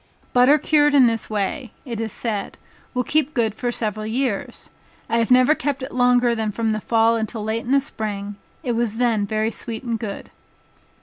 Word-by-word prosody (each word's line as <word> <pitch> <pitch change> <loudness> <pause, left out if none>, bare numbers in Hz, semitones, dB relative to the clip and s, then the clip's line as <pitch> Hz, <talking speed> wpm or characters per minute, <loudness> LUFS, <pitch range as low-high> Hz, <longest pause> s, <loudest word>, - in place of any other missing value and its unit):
Butter 255 +4 +6
cured 295 0 +3
in 270 -3 +7
this 230 -1 0
way, 215 +4 -2
(it 235 -4 -5
is 225 -1 -2
said) 215 -4 -3 0.4
will 250 - +1
keep 305 +2 0
good 225 -4 +1
for 245 +2 -2
several 215 -2 -3
years. 235 -2 -3 0.4
I 230 0 +1
have 230 - +1
never 255 +3 +6
kept 280 -2 -3
it 260 - -6
longer 245 -1 +3
than 220 -2 -1
from 225 +1 -1
the 215 0 -2
fall 225 +1 +3
until 220 -1 -3
late 220 +2 -2
in 245 - -3
the 275 - +5
spring, 205 -6 -5 0.3
it 245 - -1
was 230 -2 -1
then 230 -4 +1
very 215 +2 0
sweet 230 0 -5
and 230 -2 -2
good. 205 -3 -6
230 Hz, 195 wpm, -22 LUFS, 220-250 Hz, 0.4 s, in